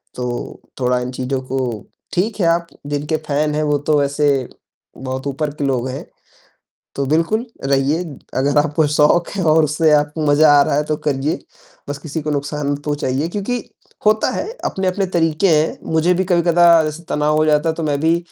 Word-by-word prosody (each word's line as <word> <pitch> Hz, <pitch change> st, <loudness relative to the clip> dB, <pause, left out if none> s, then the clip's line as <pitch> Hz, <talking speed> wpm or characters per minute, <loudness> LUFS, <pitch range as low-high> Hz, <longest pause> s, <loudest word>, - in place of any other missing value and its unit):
तो 125 Hz, -, -4 dB, 0.5 s
थोड़ा 125 Hz, 0 st, +1 dB
इन 125 Hz, +1 st, -4 dB
चीज़ों 130 Hz, +1 st, -3 dB
को 130 Hz, +1 st, -3 dB, 0.5 s
ठीक 205 Hz, +4 st, -1 dB
है, 175 Hz, -, +2 dB
आप 170 Hz, 0 st, +1 dB, 0.2 s
जिनके 145 Hz, +2 st, -1 dB
फैन 150 Hz, +1 st, 0 dB
हैं 155 Hz, -, 0 dB
वो 150 Hz, -1 st, +1 dB
तो 150 Hz, -1 st, +4 dB
वैसे 145 Hz, +1 st, +1 dB, 0.7 s
बहुत 130 Hz, +1 st, -5 dB
ऊपर 145 Hz, +2 st, -2 dB
के 145 Hz, -, -4 dB
लोग 130 Hz, -2 st, 0 dB
हैं, 130 Hz, -, -6 dB, 0.9 s
तो 140 Hz, -1 st, -2 dB
बिल्कुल 165 Hz, -, +1 dB, 0.2 s
रहिए। 140 Hz, +5 st, +1 dB, 0.4 s
अगर 140 Hz, +2 st, +2 dB
आपको 150 Hz, +1 st, +2 dB
शौक 150 Hz, +3 st, +3 dB
है 185 Hz, -, -1 dB
और 155 Hz, 0 st, +4 dB
उससे 155 Hz, +2 st, +2 dB
आपको 150 Hz, +1 st, 0 dB
मज़ा 145 Hz, +1 st, +5 dB
आ -, -, +7 dB
रहा 140 Hz, -, 0 dB
है 150 Hz, -, +1 dB
तो 150 Hz, 0 st, -1 dB
करिए। 140 Hz, +2 st, 0 dB, 0.5 s
बस 145 Hz, 0 st, -4 dB
किसी 155 Hz, 0 st, -5 dB
को 150 Hz, -, -3 dB
नुकसान 145 Hz, 0 st, -2 dB
मत 145 Hz, 0 st, -5 dB
पहुँचाइए 145 Hz, 0 st, -1 dB
क्योंकि 205 Hz, +6 st, -3 dB, 0.4 s
होता 215 Hz, 0 st, +3 dB
है -, -, -3 dB, 0.2 s
अपने-अपने 190 Hz, +1 st, -1 dB
तरीक़े 165 Hz, +3 st, +2 dB
हैं। 155 Hz, +1 st, 0 dB
मुझे 165 Hz, +3 st, +3 dB
भी 190 Hz, +1 st, 0 dB
कभी-कदा 170 Hz, -2 st, +4 dB
जैसे 155 Hz, +2 st, -5 dB
तनाव 150 Hz, +1 st, +1 dB
हो 155 Hz, -, +3 dB
जाता 150 Hz, +1 st, +2 dB
है, 160 Hz, -, 0 dB
तो 165 Hz, -, -5 dB
मैं 145 Hz, -2 st, -1 dB
भी 165 Hz, +1 st, +3 dB
150 Hz, 190 wpm, -19 LUFS, 145-165 Hz, 0.9 s, आ